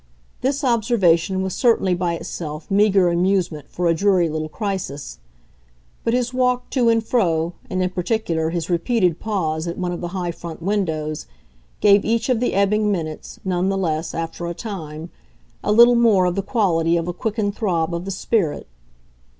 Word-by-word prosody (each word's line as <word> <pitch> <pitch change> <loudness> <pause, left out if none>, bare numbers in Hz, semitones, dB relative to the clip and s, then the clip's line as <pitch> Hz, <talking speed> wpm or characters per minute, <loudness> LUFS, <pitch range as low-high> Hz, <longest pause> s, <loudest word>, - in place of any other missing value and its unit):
This 275 +3 0
observation 200 -7 +2
was 190 -1 -3
certainly 225 -7 +2
by 175 -1 -1
itself 165 -1 -6
meagre 195 -2 +4
amusement 175 -4 0
for 180 - -3
a 165 - +4
dreary 180 -1 +2
little 155 0 -3
crisis; 185 - -4 0.8
but 230 - +1
his 250 0 -1
walk 250 -1 0
to 245 -4 +3
and 225 -1 +2
fro, 170 -8 +1 0.2
and 185 0 0
in 185 - 0
particular 180 -4 -1
his 170 -1 -3
repeated 180 0 +1
pause 165 -7 -2
at 170 - -4
one 180 -1 -2
of 175 - -5
the 175 - -3
high 175 -1 -3
front 170 -1 -8
windows, 160 - -2 0.5
gave 200 -1 +6
each 230 +2 0
of 250 -3 +2
the 245 - 0
ebbing 210 +2 +2
minutes, 160 -5 -5
none 185 0 0
the 195 - 0
less, 160 -3 -2
after 165 +1 -4
a 170 - -4
time, 165 -7 -7 0.5
a - - 0
little 235 +3 +7
more 220 -6 +4
of 180 - +1
the 195 - -1
quality 170 -7 +1
of 165 0 -2
a 175 - -2
quickened 205 +1 -2
throb 170 -6 0
of 170 +1 -3
the - - -4
spirit. 190 -3 -1
185 Hz, 175 wpm, -21 LUFS, 165-210 Hz, 0.8 s, little